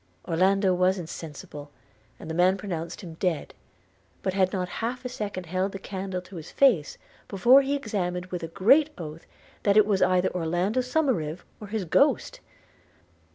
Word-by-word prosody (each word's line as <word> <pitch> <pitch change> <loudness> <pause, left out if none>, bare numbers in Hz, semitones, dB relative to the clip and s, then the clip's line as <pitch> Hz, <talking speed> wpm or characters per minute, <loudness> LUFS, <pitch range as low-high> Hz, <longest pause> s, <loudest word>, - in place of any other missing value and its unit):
– 90 - -30
Orlando 190 +3 +3
was 185 +1 +2
insensible, 150 -3 -8 0.5
and - - -9
the 160 - -4
man 180 +3 +3
pronounced 175 -4 -5
him 170 -4 -9
dead; 175 -5 -1 0.3
– 95 0 -37
but 190 - -1
had 185 -1 +2
not 180 -2 -2
half 245 +3 -3
a - - -2
second 205 -6 -5
held 185 +3 -2
the - - -4
candle 190 -1 -5
to 180 0 -11
his 160 - -8
face, 230 - +3 0.3
before 240 +7 +6
he 275 +1 -1
exclaimed 185 -9 -2
with 180 -1 -3
a 165 - -4
great 265 - +4
oath, 160 -2 -8 0.3
that 200 0 +3
it 215 - +7
was 200 -2 +1
either 185 0 +2
Orlando 180 +7 0
Somerive, 250 - -1 0.2
or 210 - -8
his 210 -2 -3
ghost! 160 - +2
185 Hz, 175 wpm, -26 LUFS, 170-210 Hz, 0.5 s, it